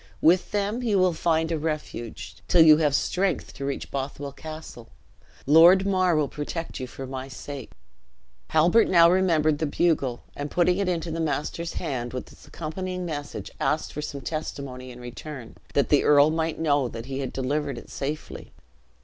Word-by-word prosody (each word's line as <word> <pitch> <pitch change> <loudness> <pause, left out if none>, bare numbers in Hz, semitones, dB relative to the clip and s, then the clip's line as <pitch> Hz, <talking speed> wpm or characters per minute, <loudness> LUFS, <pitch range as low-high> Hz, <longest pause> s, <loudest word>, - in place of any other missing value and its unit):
With 175 +3 +4
them 205 +3 -1
you 220 -5 +1
will 185 -2 +3
find 160 0 +1
a 160 - 0
refuge, 150 -7 -5
till 170 - +6
you 155 -1 +8
have 150 -3 +2
strength 185 +5 0
to 140 - -6
reach 140 0 -4
Bothwell 140 +1 -4
Castle. 155 -6 -9 0.6
Lord 170 +6 +7
Mar 185 -3 +2
will 150 -2 +2
protect 150 +4 -5
you 130 - -4
for 135 +2 -8
my 130 0 -6
sake." 135 -1 -8 0.8
Halbert 170 +8 +4
now 170 -2 +6
remembered 160 -5 +2
the 160 - 0
bugle, 145 -6 0
and 145 +1 -4
putting 180 +3 +2
it 195 -2 0
into 170 -1 -2
the 165 - -3
master's 160 +2 -2
hand, 120 -3 -3
with 125 - -6
its - - -17
accompanying 180 +3 -5
message, 145 -4 -5
asked 155 - -1
for 150 - -4
some 140 -2 -5
testimony 135 -4 -5
in 125 0 -10
return, 125 +1 -8 0.2
that 140 - +2
the 145 - +4
earl 150 +1 +6
might 160 0 -1
know 145 -4 +2
that 115 -1 -7
he 135 0 -4
had 135 -2 -3
delivered 140 0 -2
it - - -11
safely. 150 +2 -5
155 Hz, 175 wpm, -25 LUFS, 140-170 Hz, 0.8 s, you